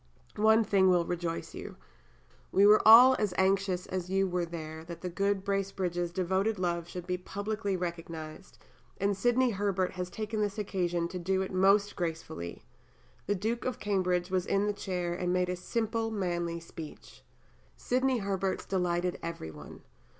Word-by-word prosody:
One 220 +1 +5
thing 195 -3 +3
will 175 -2 +3
rejoice 170 -1 -3
you. - - -8 0.8
We 195 +2 +5
were 210 +1 +7
all 245 +4 +10
as 205 -4 -1
anxious 190 -1 +1
as 185 -1 -4
you 195 0 +2
were 175 -1 -1
there 160 -1 -7
that 170 -1 -8
the 180 - -3
good 200 +1 0
Bracebridges' 190 -3 -1
devoted 190 +4 0
love 170 -2 -1
should 175 0 -7
be 180 0 -2
publicly 200 +1 -3
recognized, 165 -1 -6 0.4
and 200 +1 +1
Sidney 245 +4 +2
Herbert 195 -2 0
has 180 -1 -5
taken 215 +2 -3
this 205 0 -1
occasion 175 -4 -1
to 180 - -5
do 190 +2 0
it 190 - -6
most 200 +2 +3
gracefully. 160 - -5 0.6
The 205 - +1
Duke 225 +5 -2
of 255 -3 -2
Cambridge 185 -3 0
was 185 -1 0
in 200 +1 +2
the 210 - 0
chair 180 -3 -3
and 180 0 -1
made 180 0 +1
a 180 - -1
simple, 225 +4 -2
manly 175 -5 -2
speech. 165 -2 -11 0.6
Sidney 255 +1 +1
Herbert's 195 -2 -2
delighted 180 -1 -1
every 165 - -5
one. 75 -1 -12
185 Hz, 165 wpm, -30 LUFS, 175-205 Hz, 0.8 s, all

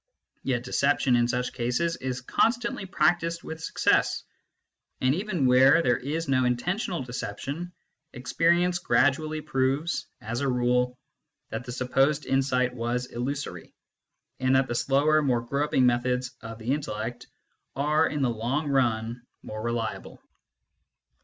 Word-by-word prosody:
Yet 125 -3 -1
deception 135 0 +2
in 120 0 +3
such 125 +1 -2
cases 125 +8 0
is 130 -1 -4
constantly 230 - 0
practised 165 -1 +1
with 160 0 -7
success; - - +1 0.8
and 130 +1 +3
even 185 -4 -1
where 130 +6 +6
there 125 -1 +3
is 155 +5 -3
no 130 -2 +2
intentional 170 - -1
deception, 135 +8 -5 0.4
experience 170 +7 +1
gradually 155 +2 +1
proves, 140 +3 -1
as 115 +4 -4
a 140 - 0
rule, 125 0 +1 0.5
that 115 +2 -5
the 125 - -6
supposed 135 +4 +1
insight 130 -2 +1
was 120 +1 -2
illusory, 135 +4 -5 0.6
and 130 0 +2
that 135 0 +3
the - - -2
slower 145 +5 +3
more 125 -5 +1
groping 140 +1 +1
methods 125 +1 +1
of 115 0 -8
the 115 +4 -1
intellect 120 -5 -4 0.5
are 150 +3 +2
in 150 -2 -2
the 130 - +2
long 125 +7 -2
run 120 -3 0 0.2
more 110 0 -6
reliable. 115 0 -3
130 Hz, 135 wpm, -27 LUFS, 125-150 Hz, 0.8 s, where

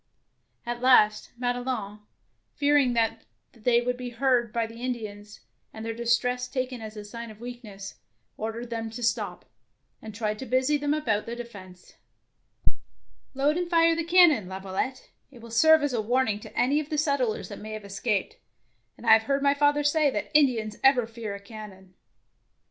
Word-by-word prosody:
At 240 0 -4
last 215 -5 +4
Madelon, 245 -4 -2 0.6
fear 290 0 +2
ing 265 -4 +4
that 225 -1 0 0.3
they 235 0 +2
would 250 0 -1
be 250 -1 -5
heard 240 -1 +1
by 230 0 0
the 230 +1 -11
Indians, 210 -4 -5 0.3
and 220 0 -8
their 225 - -2
distress 245 +2 0
taken 255 -2 -3
as 215 -1 -8
a 210 - -7
sign 230 +2 -8
of 215 -1 -13
weakness, 225 -5 -9 0.4
ordered 230 +2 -5
them 225 -1 -3
to 235 +2 -7
stop, 225 -2 -1 0.6
and 215 -1 -9
tried 215 -1 -2
to 265 - -6
busy 260 +4 +2
them 290 0 0
about 220 -9 -1
the 235 - -4
defence. 200 -7 -11 1.4
"Load 290 +4 +2
and 355 -1 -2
fire 330 -1 +4
the 335 - -1
cannon, 330 - +5
Lavio 190 0 -7
lette; 260 +6 -3 0.2
it 260 -3 -15
will 230 0 -12
serve 315 +6 +6
as 290 -3 0
a 230 - +1
warning 225 -1 +1
to - - -12
any 275 +5 +3
of 305 -1 -5
the 305 - -2
settlers 280 -7 0
that - - -8
may 215 +1 -7
have 215 -1 -7
escaped, 205 - -2 0.6
and - - -12
I - - +8
have 220 0 +4
heard 275 0 +1
my 280 0 +4
father 290 0 +2
say 290 0 +3
that - - -4
Indians 230 -8 +3
ever 265 -3 +5
fear 225 -3 -6
a - - -8
cannon. 200 -3 -11
235 Hz, 180 wpm, -27 LUFS, 215-270 Hz, 1.4 s, I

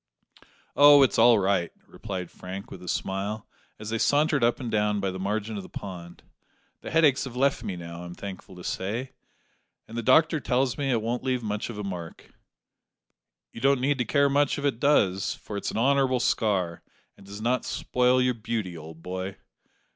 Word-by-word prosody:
"Oh, 145 -1 +8
it's 130 - +2
all 115 0 +7
right," 95 -3 +1
replied 95 -5 -6
Frank, 95 +2 -8
with 90 - -9
a 90 - -11
smile, 100 +4 -3 0.3
as 105 +1 -7
they 115 - -1
sauntered 145 0 +2
up 120 0 +2
and 120 -3 -4
down 105 -1 +1
by 100 -1 -1
the 95 - -6
margin 105 +2 -2
of - - -4
the - - -12
pond; 85 -3 -9 0.6
"the - - -8
headaches 155 -5 +3
have 125 -2 -8
left 135 -1 +1
me 100 -5 -4
now, 85 0 -8
I'm 85 0 -8
thankful 95 -2 -9
to 90 - -11
say, 110 +10 -3 0.8
and 115 - -10
the 120 - -1
doctor 155 +6 +4
tells 130 -1 0
me 140 -2 -2
it 115 -4 +1
won't 120 +2 -2
leave 130 -2 -1
much 105 +1 -3
of 115 - -7
a 105 - -4
mark." 90 -4 -7 1.2
"You 115 - -10
don't 140 -1 +3
need 135 +1 +1
to 125 - +1
care 140 +4 +3
much 140 0 +2
if 145 - -3
it 135 -5 0
does, 100 -10 +2
for 105 - -9
it's 100 - -3
an - - -4
honourable 130 +1 +3
scar, 95 -8 0 0.3
and - - -17
does 100 +1 -9
not 120 +3 0
spoil 125 0 +1
your 125 0 +2
beauty, 110 -5 -4
old 80 0 -11
boy." 95 +1 -5
110 Hz, 195 wpm, -26 LUFS, 95-130 Hz, 1.2 s, Oh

